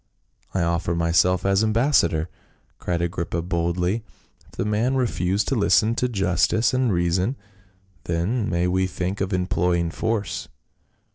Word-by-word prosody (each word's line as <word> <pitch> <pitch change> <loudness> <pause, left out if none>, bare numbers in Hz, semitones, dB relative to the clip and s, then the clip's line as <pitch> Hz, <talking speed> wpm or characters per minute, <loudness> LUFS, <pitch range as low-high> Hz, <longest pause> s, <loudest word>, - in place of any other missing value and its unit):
"I 95 - +2
offer 85 0 0
myself 85 +2 +2
as 100 +2 +3
ambassador," 110 - +2 0.5
cried 85 -1 -1
Agrippa 85 -1 -2
boldly. 90 +4 -1 0.4
"If - - -24
the - - -3
man 110 +5 +1
refuse 100 -6 0
to 135 - -1
listen 110 +1 +3
to 125 +1 0
justice 100 +3 +1
and 130 -2 +2
reason, 90 +7 0 0.7
then 100 +7 -1
may 85 0 +1
we 95 +1 +1
think 95 +2 -3
of 95 0 -1
employing 90 -2 0
force." 105 -1 -2
90 Hz, 135 wpm, -23 LUFS, 85-110 Hz, 0.7 s, as